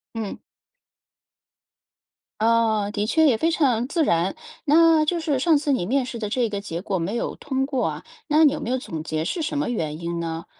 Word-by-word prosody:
嗯。 220 -3 -5 2.0
哦， 220 -2 +2
的 210 -1 -1
确 320 +8 +3
也 245 -6 +3
非 330 +8 +1
常 255 -8 +2
自 325 +1 +1
然。 170 0 +1 0.3
那 325 0 +5
就 340 +2 0
是 305 -5 0
上 315 +3 +4
次 285 -1 0
你 250 - 0
面 260 +6 +1
试 245 -1 -6
的 210 -2 -3
这 240 +2 +1
个 205 -2 -4
结 170 -4 -5
果 195 -1 -2
没 180 +6 -2
有 - - -3
通 265 -2 -2
过 270 -2 -1
啊， - - -3 0.2
那 310 +1 +5
你 290 - +4
有 300 - -5
没 - - -4
有 255 - +1
总 160 -11 -6
结 155 0 -2
是 330 - -2
什 300 -1 -2
么 290 - 0
原 155 -10 -3
因 170 0 -3
呢？ 165 0 -4
240 Hz, 225 characters per minute, -23 LUFS, 195-295 Hz, 2.0 s, 那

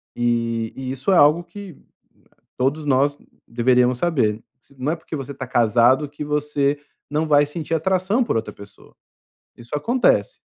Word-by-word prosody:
e 115 -1 -1
e 130 -1 -5
isso 135 +8 -2
é - - +5
algo 150 +3 +5
que 180 -1 -11 0.8
todos 145 +4 -1
nós 140 +1 +2 0.3
deveríamos 125 +1 +2
saber, 115 -11 0 0.4
não 135 +5 -1
é 170 - -2
porque 160 0 -8
você 140 0 -6
tá 130 - -6
casado 120 +4 +3
que 145 +1 -7
você 145 -1 0 0.3
não 155 +2 0
vai 145 -1 +4
sentir 160 +2 -4
atração 190 - +1
por 230 - -1
outra 110 - -3
pessoa, 100 0 -16 0.6
isso 120 +4 -10
acontece, 240 - +1
145 Hz, 155 wpm, -21 LUFS, 125-160 Hz, 0.8 s, é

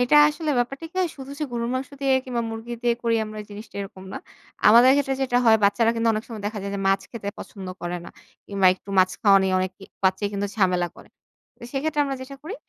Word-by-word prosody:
এটা 250 +4 +4
আসলে 305 +1 -3
ব্যাপারটা 275 +6 -2
কি - - -47
হয় 360 - +1
শুধু 270 0 -9
যে, 310 - -3
গরুর 235 0 -2
মাংস 260 0 -3
দিয়ে 275 -1 +2
কিংবা 240 -2 -2
মুরগি 225 +1 -6
দিয়ে 240 -1 +3
করি 230 -1 +2
আমরা 215 0 -7
জিনিসটা 210 +1 -10
এরকম 190 -1 -8
না। - - -4 0.5
আমাদের 235 +4 +8
ক্ষেত্রে 270 -1 +1
যেটা 250 -2 +1
হয় 220 - +7
বাচ্চারা 225 +3 +3
কিন্তু 230 0 +1
অনেক 215 +1 -2
সময় 220 -3 -7
দেখা 210 0 -4
যায় 200 - -4
যে, - - -3
মাছ 195 0 +3
খেতে 210 -4 -6
পছন্দ 195 -3 -9
করে 175 0 -3
না। - - -8 0.4
কিংবা 195 -2 +2
একটু 195 - -23
মাছ 185 0 +5
খাওয়া 200 -3 +7
নিয়ে 190 -1 +1
অনেক 185 0 -1
ই - - -8 0.2
বাচ্চাই 190 +2 +2
কিন্তু 200 0 -1
ঝামেলা 180 -3 +2
করে। - - -15 0.5
তো - - -37
সেক্ষেত্রে 295 +2 0
আমরা 275 -1 -3
যেটা 275 +1 -9
করি 355 +8 -6
225 Hz, 235 wpm, -24 LUFS, 200-260 Hz, 0.5 s, আমাদের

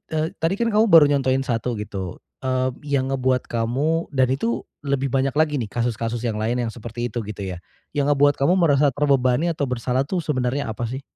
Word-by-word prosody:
eee, 155 +1 +1
tadi 165 +4 +1
kan 235 -1 0
kamu 215 +2 +5
baru 165 -4 +8
nyontohin 135 -1 +1
1 120 -1 -1
gitu, 95 -4 -5 0.2
eee, 130 0 0 0.2
yang 135 -1 0
ngebuat 130 -1 +1
kamu 135 +9 -1
dan 130 -1 +3
itu 230 - -1 0.2
lebih 140 -1 0
banyak 135 0 +1
lagi 150 -3 +2
nih 110 - -3
kasus-kasus 115 0 -2
yang 110 -2 -1
lain 120 +3 0
yang 115 - -3
seperti 120 +1 -5
itu 120 - -3
gitu 105 -1 -6
ya? 90 -2 -5 0.4
Yang 145 0 +2
ngebuat 145 +1 +3
kamu 170 +6 +4
merasa 145 -4 +4
terbebani 140 +2 +2
atau 145 -4 -2
bersalah 125 +1 0
tuh 180 -4 -2
sebenarnya 130 -3 -1
apa 115 +1 -4
sih? 130 +3 -5
130 Hz, 200 wpm, -22 LUFS, 120-145 Hz, 0.4 s, baru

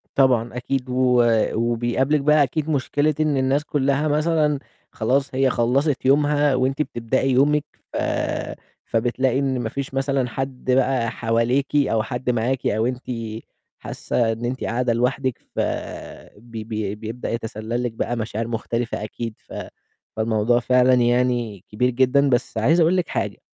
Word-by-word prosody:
طبعًا 125 -3 +2
أكيد، 130 +1 -2
و 125 -1 +3 0.3
وبيقابلِك 120 +5 +1
بقى 150 +1 +5
أكيد 155 +2 -2
مشكلة 145 +1 +1
إن 155 -2 +2
الناس 135 +2 +1
كلّها 140 +1 +1
مثلًا 150 -1 +1 0.3
خلاص 130 +4 0
هي 135 0 +3
خلَّصت 130 +4 +1
يومها 145 0 +3
وأنتِ 130 +3 0
بتبدئي 130 0 -1
يومِك، 145 +3 +3 0.3
ف - - -2 0.9
فبتلاقي 125 +3 +1
إن 135 -2 0
ما 115 -2 -2
فيش 135 +2 -5
مثلًا 135 -1 0
حد 130 0 -3
بقى 125 -3 +2
حواليكِ، 120 +5 0
أو 125 -6 +2
حد 125 +2 -4
معاكِ، 125 +2 0
أو 110 +2 +1
أنتِ 125 +1 -3 0.8
حاسّة 115 -2 -1
إن 115 +2 -4
أنتِ 130 +2 -3
قاعدة 120 +1 0
لوحدِك، 125 +1 0 0.2
ف - - -2 0.8
بي 115 0 -8
بي 105 -2 -3
بيبدأ 110 +3 -6
يتسلّل 115 +1 -3
لِك 120 - -1
بقى 115 +2 -2
مشاعر 110 0 -3
مختلفة 115 -1 -3
أكيد، 115 +1 -5
ف - - -12 0.6
فالموضوع 110 +2 +2
فعلًا 125 +1 +4
يعني 120 -4 +1
كبير 125 +4 +1
جدًا، 130 +3 +3
بس 120 -2 0
عايز 140 +11 +3
أقول 170 +3 +4
لِك 180 - 0
حاجة - - -3
125 Hz, 150 wpm, -22 LUFS, 115-135 Hz, 0.9 s, بقى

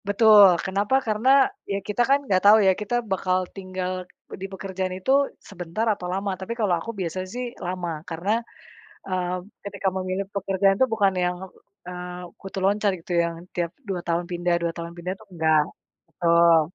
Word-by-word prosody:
Betul. 205 -3 +7
Kenapa, 200 +6 +1
karena, 220 +4 +1 0.4
ya 195 - 0
kita 210 +3 0
kan 275 +1 +5
nggak 185 -6 +2
tahu 210 +2 +9
ya - - +7
kita 210 +3 -2 0.2
bakal 185 -1 +1 0.2
tinggal 185 -1 -4 0.5
di - - -3
pekerjaan 190 -1 -4
itu, 190 +8 -1 0.4
sebentar 180 +3 -3
atau 180 -3 -7
lama. 195 +1 -1
Tapi 190 +4 -4
kalau 205 -5 +2
aku 230 - -5
biasa 180 0 -3
sih, 250 +1 -3 0.2
lama, 180 -1 -3 0.2
karena, 170 +5 -2 0.8
eee, 180 -1 -1 0.3
ketika 200 -1 -2
memilih 185 +1 -2
pekerjaan 195 0 +2
itu 260 - +4
bukan 200 -3 +3
yang, 180 0 0 0.5
eee, 180 0 -6 0.2
kutu 195 0 -6
loncat 205 +1 +2
gitu 170 +2 -8
ya, - - +1 0.3
tiap 170 -1 -1 0.2
dua 185 -2 -2
tahun 170 0 0
pindah 175 0 0
dua 170 -1 0
tahun 170 0 -6
pindah, 180 +2 -3
itu - - -17
nggak. 160 -1 +4 0.5
Betul. 170 -1 +5
185 Hz, 170 wpm, -24 LUFS, 175-200 Hz, 0.8 s, tahu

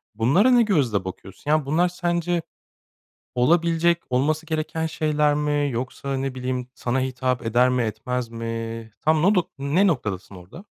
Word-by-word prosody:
Bunlara 140 - +4
ne 245 -1 +6
gözle 130 - +1
bakıyorsun? 95 +9 -6
Ya, 155 -2 +2
bunlar 165 +6 +2
sence 175 -1 -1 0.9
olabilecek, 170 +5 +3
olması 150 +5 +1
gereken 160 0 -2
şeyler 150 -2 +1
mi 145 -1 0
yoksa, 130 +3 -3
ne 135 -1 -3
bileyim, 125 0 -3
sana 125 +2 -1
hitap 130 -2 -1
eder 125 +3 +3
mi 125 -1 +1
etmez 115 +3 -3
mi? 115 -1 -5
Tam 155 0 +3
nodu 190 -2 +3
ne 155 +9 +2
noktadasın 105 - -2
orada? 95 - -12
140 Hz, 145 wpm, -23 LUFS, 120-160 Hz, 0.9 s, ne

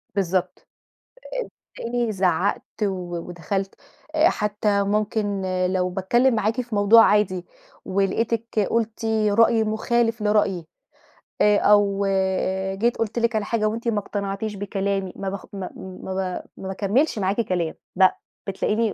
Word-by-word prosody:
بالضبط، 185 -1 -1 1.1
آآ، - - -6
تلاقيني 235 -1 -1
زعّقت 190 0 +1 0.2
و 180 -3 -2
ودخلت، 190 +3 -3 0.4
آآ، 315 +3 +5
حتى 210 - 0
ممكن 205 0 0 0.3
لو 185 -1 +1
باتكلم 235 +8 +2
معاكِ 220 +3 0
في 235 -3 -6
موضوع 205 +3 +7
عادي 185 -4 +2 0.4
ولقيتِك 225 +4 0
قلتِ 225 -1 -1 0.2
رأي 225 +1 +4
مخالف 225 +1 0
لرأيي، 205 -5 +1 0.8
آآ 210 0 +5
أو 200 -1 +3 0.7
جيت 235 +5 +1
قُلت 225 +1 -1
لِك 235 0 +1
على 215 -1 0
حاجة 215 -1 0
وأنتِ 230 +2 -3
ما 215 -3 +2
اقتنعتيش 200 +1 -4
بكلامي، 195 -1 -2
ما 195 - -3
باخ 195 0 -6
ما 190 -2 -5
ما 190 0 -7
ب 185 -1 -3
ما 190 - -5
باكملش 210 +8 +1
معاكِ 195 +3 +1
كلام 175 -6 -1 0.2
لأ، 185 0 +4 0.3
بتلاقيني 210 +2 0
205 Hz, 135 wpm, -23 LUFS, 190-225 Hz, 1.1 s, موضوع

